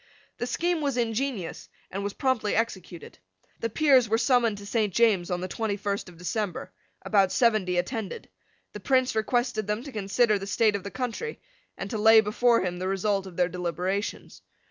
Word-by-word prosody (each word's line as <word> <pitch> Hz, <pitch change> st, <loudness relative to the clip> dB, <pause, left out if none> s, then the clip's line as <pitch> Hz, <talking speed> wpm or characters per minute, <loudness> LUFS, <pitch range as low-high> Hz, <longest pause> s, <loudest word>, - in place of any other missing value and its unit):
The 245 Hz, -, -2 dB
scheme 345 Hz, +3 st, 0 dB
was 280 Hz, -4 st, -1 dB
ingenious, 230 Hz, -4 st, -2 dB, 0.2 s
and 195 Hz, +2 st, -4 dB
was 200 Hz, 0 st, -3 dB
promptly 260 Hz, -6 st, 0 dB
executed. 190 Hz, -7 st, -4 dB, 0.4 s
The 230 Hz, -, -2 dB
Peers 260 Hz, -2 st, +4 dB
were 225 Hz, -, +3 dB
summoned 235 Hz, -2 st, +2 dB
to 200 Hz, -, -10 dB
St. 210 Hz, -1 st, 0 dB
James's 200 Hz, -4 st, +3 dB
on 180 Hz, -1 st, -2 dB
the 185 Hz, -, -3 dB
twenty 205 Hz, +1 st, -2 dB
first 200 Hz, -2 st, -3 dB
of 175 Hz, -, -15 dB
December. 185 Hz, 0 st, -3 dB, 0.3 s
About 195 Hz, -3 st, +3 dB
seventy 215 Hz, -7 st, +2 dB
attended. 220 Hz, +2 st, -3 dB, 0.5 s
The -, -, -6 dB
Prince 260 Hz, -1 st, +2 dB
requested 220 Hz, -1 st, 0 dB
them 210 Hz, +3 st, -2 dB
to 280 Hz, -, -8 dB
consider 210 Hz, 0 st, +1 dB
the 195 Hz, -, -6 dB
state 210 Hz, +1 st, +2 dB
of 200 Hz, -, -4 dB
the 200 Hz, -, -5 dB
country, 250 Hz, -, -4 dB, 0.4 s
and -, -, -5 dB
to 220 Hz, -, -2 dB
lay 220 Hz, +1 st, +7 dB
before 230 Hz, +3 st, +3 dB
him 180 Hz, -1 st, -3 dB
the 185 Hz, -, -2 dB
result 195 Hz, 0 st, 0 dB
of 180 Hz, -2 st, -12 dB
their 180 Hz, -1 st, +3 dB
deliberations. 180 Hz, +3 st, -3 dB
210 Hz, 185 wpm, -27 LUFS, 190-235 Hz, 0.5 s, lay